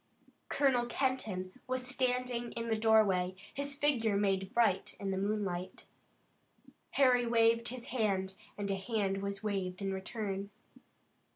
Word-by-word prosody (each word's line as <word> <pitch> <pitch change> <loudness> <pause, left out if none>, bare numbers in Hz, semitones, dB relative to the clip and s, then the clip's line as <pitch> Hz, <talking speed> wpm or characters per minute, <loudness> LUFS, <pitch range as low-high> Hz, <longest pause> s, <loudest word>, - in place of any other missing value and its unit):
Colonel 255 -4 +2
Kenton 225 -6 -2
was 255 0 -1
standing 250 -2 -1
in 230 0 -3
the 220 - +2
doorway, 210 -5 +3 0.2
his 280 0 -2
figure 245 -8 +2
made 195 -1 +1
bright 225 -6 +2
in 195 -1 -2
the 190 - -1
moonlight. 195 -3 -2 1.1
Harry 250 -3 +5
waved 230 0 +4
his 245 -1 -5
hand 195 -6 0 0.2
and 200 -1 -2
a - - +1
hand 195 -1 -1
was 200 +1 -4
waved 190 -3 -2
in 195 -1 -2
return. 195 0 -4
215 Hz, 130 wpm, -33 LUFS, 195-245 Hz, 1.1 s, Harry